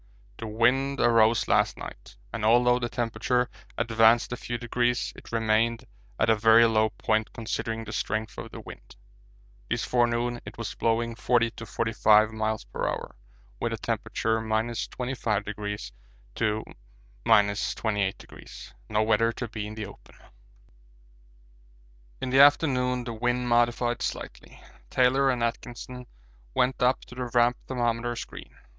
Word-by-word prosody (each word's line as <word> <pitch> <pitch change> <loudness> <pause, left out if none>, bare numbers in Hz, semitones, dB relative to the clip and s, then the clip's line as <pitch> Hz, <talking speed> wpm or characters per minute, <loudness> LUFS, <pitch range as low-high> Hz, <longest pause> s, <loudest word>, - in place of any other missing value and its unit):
The 115 - -5
wind 125 +6 +1
arose 115 -1 +4
last - - +2
night, - - -10 0.2
and 115 -1 -4
although 120 +2 +4
the 120 -1 -2
temperature 120 +2 0 0.3
advanced 115 +1 +4
a - - -1
few 120 0 -5
degrees 120 +1 -1
it - - -13
remained 115 +1 +1 0.3
at 110 - +3
a 110 - +5
very 115 +2 +6
low 110 -1 +3
point 110 0 -1
considering 115 0 -3
the 110 0 -8
strength 110 +1 -2
of - - -7
the - - -9
wind. - - -12 0.7
This - - -1
forenoon 120 0 +1
it - - -10
was 115 -4 -4
blowing 115 +1 0
40 120 +1 +1
to 115 0 -10
45 110 -1 +3
m.p.h. 110 0 -2 0.9
with - - -1
a - - -3
temperature 110 0 -1
25° 110 -2 -3 0.4
to 110 -1 -1 0.6
28°. 105 -2 0 0.2
No 110 0 +2
weather 115 +1 +3
to 120 - -5
be 110 -2 -5
in 105 - -8
the 110 -1 -5
open. 100 - -14 2.0
In 130 - -3
the 135 - +4
afternoon 130 -3 +4
the 120 -1 -5
wind 120 +2 -1
modified 120 0 +2
slightly. - - -6 0.3
Taylor 130 +2 +3
and 125 -2 0
Atkinson 120 +1 -5 0.5
went 130 +1 +1
up 125 +1 +3
to - - -13
the 125 0 -4
Ramp 120 +1 +4
thermometer 120 -1 -1
screen. - - -9
115 Hz, 135 wpm, -27 LUFS, 110-120 Hz, 2.0 s, very